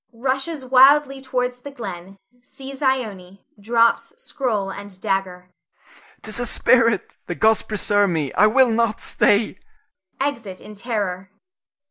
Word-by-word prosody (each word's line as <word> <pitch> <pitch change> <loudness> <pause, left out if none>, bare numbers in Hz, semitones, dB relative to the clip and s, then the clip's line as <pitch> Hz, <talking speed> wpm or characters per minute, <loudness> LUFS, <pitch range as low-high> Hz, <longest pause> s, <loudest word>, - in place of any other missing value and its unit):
[Rushes 265 +4 -3
wildly 270 +2 +5
towards 250 -1 -3
the 285 - -8
glen, 195 -7 -8 0.2
sees 270 +2 -10
Ione, 205 -9 -2
drops 230 +2 +1
scroll 230 - -3
and 200 -1 -10
dagger.] 180 -2 -3 0.7
'Tis 215 +1 -4
a 245 - -1
spirit! 230 -3 +2
The 175 - -4
gods 220 +3 +3
preserve 205 -1 +1
me, 155 -5 -2
I 210 - +5
will 250 +2 +4
not 225 -1 0
stay! 205 -1 +2 0.6
[_Exit 235 -9 -3
in 210 - -12
terror. 200 -4 -4
225 Hz, 125 wpm, -21 LUFS, 195-260 Hz, 0.7 s, wildly